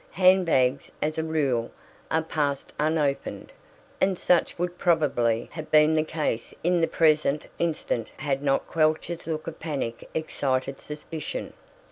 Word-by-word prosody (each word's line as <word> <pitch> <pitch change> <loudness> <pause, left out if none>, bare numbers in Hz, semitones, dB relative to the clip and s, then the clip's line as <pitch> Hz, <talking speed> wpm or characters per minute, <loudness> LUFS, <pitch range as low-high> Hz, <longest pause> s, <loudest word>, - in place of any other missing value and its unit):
Hand 185 0 +5
bags, 130 -3 +2
as 155 +1 -1
a - - 0
rule, 140 -7 0 0.4
are 160 0 +1
"passed" 145 -3 -2
unopened, 150 -2 0 0.5
and 190 -1 +3
such 175 0 +2
would 175 +1 -3
probably 125 -9 +2
have 155 -1 -7
been 155 0 +6
the 155 - +3
case 155 -7 -2
in 175 0 +3
the 165 - +3
present 155 -2 +2
instance 155 -8 -1
had 140 -2 -1
not 140 -1 +1
Quelch's 160 +2 0
look 155 -1 -3
of 165 -1 -7
panic 140 -7 -4
excited 135 -4 -1
suspicion. 155 - -6
155 Hz, 140 wpm, -26 LUFS, 140-165 Hz, 0.5 s, been